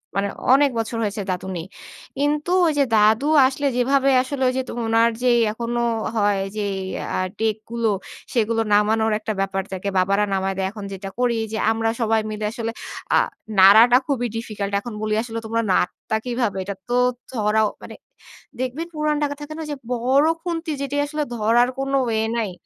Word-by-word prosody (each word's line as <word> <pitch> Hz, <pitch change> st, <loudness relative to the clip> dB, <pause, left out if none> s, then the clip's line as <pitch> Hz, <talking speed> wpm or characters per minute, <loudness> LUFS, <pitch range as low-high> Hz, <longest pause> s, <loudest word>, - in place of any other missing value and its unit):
মানে 200 Hz, 0 st, +1 dB, 0.3 s
অনেক 280 Hz, +1 st, +5 dB
বছর 225 Hz, +1 st, -3 dB
হয়েছে 205 Hz, 0 st, -2 dB
দাদু 180 Hz, +1 st, -4 dB
নেই। 165 Hz, -, -5 dB, 0.5 s
কিন্তু 295 Hz, +4 st, 0 dB, 0.2 s
ওই 315 Hz, -, +1 dB
যে -, -, +6 dB
দাদু 220 Hz, +6 st, +4 dB, 0.2 s
আসলে 275 Hz, +2 st, -3 dB
যেভাবে 270 Hz, +2 st, +3 dB
আসলে 265 Hz, +1 st, -5 dB
ওই -, -, -2 dB
যে 260 Hz, -, +1 dB
ত -, -, -9 dB, 0.2 s
উনার 225 Hz, +1 st, +4 dB
যে 250 Hz, -, +4 dB, 0.2 s
এখনো 235 Hz, +2 st, -2 dB, 0.3 s
হয় 205 Hz, -2 st, +2 dB, 0.2 s
যে 210 Hz, -, -1 dB, 0.5 s
অ্যা -, -, -1 dB, 0.2 s
ডেক 220 Hz, -1 st, +1 dB
গুলো, 235 Hz, -1 st, 0 dB, 0.4 s
সেগুলো 225 Hz, -1 st, +1 dB
নামানোর 220 Hz, +1 st, +3 dB
একটা 220 Hz, 0 st, -3 dB
ব্যাপার 195 Hz, 0 st, -1 dB
থাকে। 190 Hz, +1 st, -4 dB
বাবারা 195 Hz, +3 st, +2 dB
নামায় 195 Hz, 0 st, 0 dB
দেয়, 190 Hz, -1 st, 0 dB
এখন 210 Hz, -1 st, -9 dB
যেটা 195 Hz, 0 st, -6 dB
করি 245 Hz, -2 st, +2 dB
যে, 220 Hz, -, -2 dB
আমরা 225 Hz, 0 st, 0 dB
সবাই 225 Hz, -1 st, +2 dB
মিলে 215 Hz, 0 st, -4 dB
আসলে 230 Hz, -1 st, -4 dB, 0.4 s
আ -, -, +6 dB, 0.4 s
নাড়াটা 220 Hz, +6 st, +8 dB
খুবই 245 Hz, -4 st, 0 dB
ডিফিকাল্ট। 210 Hz, -3 st, -4 dB
এখন 230 Hz, +3 st, -8 dB
বলি 215 Hz, 0 st, -1 dB
আসলে, 230 Hz, -1 st, -5 dB
"তোমরা 230 Hz, +1 st, 0 dB
নাড়তা 185 Hz, +4 st, 0 dB
কিভাবে?" 240 Hz, -5 st, -1 dB
এটা 200 Hz, +1 st, -5 dB
তো 245 Hz, -, +1 dB, 0.4 s
ধরাও 215 Hz, -2 st, +1 dB
মানে -, -, -9 dB, 0.6 s
দেখবেন 260 Hz, +6 st, -3 dB
পুরান 300 Hz, 0 st, 0 dB
ঢাকা 285 Hz, 0 st, -1 dB
থাকে 295 Hz, +1 st, -7 dB
না -, -, -5 dB
ঐ -, -, -9 dB
যে 290 Hz, -, -4 dB, 0.2 s
বড় 260 Hz, +5 st, +3 dB, 0.2 s
খুন্তি 335 Hz, -2 st, -3 dB
যেটি 280 Hz, +1 st, -2 dB
আসলে 300 Hz, +1 st, -2 dB
ধরার 235 Hz, +3 st, +3 dB
কোন 270 Hz, 0 st, -2 dB
ওয়ে 220 Hz, -2 st, 0 dB, 0.2 s
নাই। 215 Hz, -4 st, -1 dB
230 Hz, 185 wpm, -22 LUFS, 210-260 Hz, 0.6 s, নাড়াটা